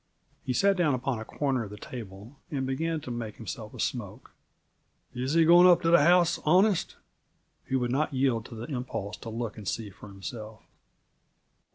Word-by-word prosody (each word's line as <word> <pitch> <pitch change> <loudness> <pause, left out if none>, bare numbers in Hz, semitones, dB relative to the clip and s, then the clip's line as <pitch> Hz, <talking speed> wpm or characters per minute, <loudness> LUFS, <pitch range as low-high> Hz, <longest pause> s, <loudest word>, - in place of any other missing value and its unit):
He - - -2
sat 195 +6 +3
down 155 -6 +2
upon 125 -1 -2
a - - -5
corner 135 -2 -1
of - - -9
the 105 - -9
table 110 +2 -10
and 135 -3 -2
began 160 +4 -2
to 125 - -7
make 115 -3 -5
himself 110 -8 -7
a - - -11
smoke. - - -4 0.8
"Is 130 +3 -2
he 165 -1 +5
going 175 +2 +8
up 180 0 +5
to 165 - +3
the 170 - +7
house 175 +1 +4
honest?" 185 +4 +3 0.7
He 135 - -1
would 125 -2 0
not 155 +4 0
yield 130 -4 +1
to 115 - -10
the 115 +1 -6
impulse 125 -6 -4
to 115 - -8
look 115 0 -4
and 100 - -9
see 110 -3 -3
for 100 - -13
himself. 110 +3 -8
130 Hz, 190 wpm, -28 LUFS, 110-160 Hz, 0.8 s, going